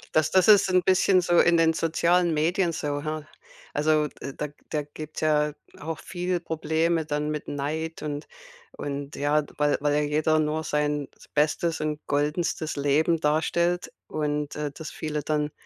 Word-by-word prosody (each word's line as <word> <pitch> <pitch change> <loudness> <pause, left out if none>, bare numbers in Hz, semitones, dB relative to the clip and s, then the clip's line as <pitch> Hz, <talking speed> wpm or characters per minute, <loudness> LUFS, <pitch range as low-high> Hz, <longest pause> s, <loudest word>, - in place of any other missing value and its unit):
Das 155 0 +3
das 185 -1 +4
ist 200 -2 +7
'n 185 0 +4
bisschen 185 +1 +4
so 175 -1 +3
in 175 -1 +5
den 165 0 +4
sozialen 170 +1 +2
Medien 170 +4 +1
so, 145 -2 -3
ha? 155 0 -4 0.5
Also 155 0 +2
de 140 - -8
da 150 - -2
g 145 - -18 0.2
da 150 - -1
gibt's 155 0 -7
ja 150 -1 +2 0.3
auch 160 +1 -5
viele 180 0 -2
Probleme 160 0 0
dann 150 0 -1
mit 150 -1 -4
Neid 155 +3 -3
und 145 0 -4 0.5
und 140 0 -5
ja, 145 +1 +2
weil 150 0 +3
weil 145 0 +2
ja 150 - +2
jeder 155 +1 +2
nur 155 +1 0
sein 150 -2 -1 0.2
bestes 160 +2 +1
und 150 -1 -2
goldenstes 150 +2 -1
Leben 150 +4 +2
darstellt 170 +3 +1 0.2
und, 150 -1 -2
äh, 150 -1 -3
das 155 +2 -7
viele 150 -1 -4
dann, 150 0 -1
155 Hz, 170 wpm, -26 LUFS, 150-165 Hz, 0.5 s, ist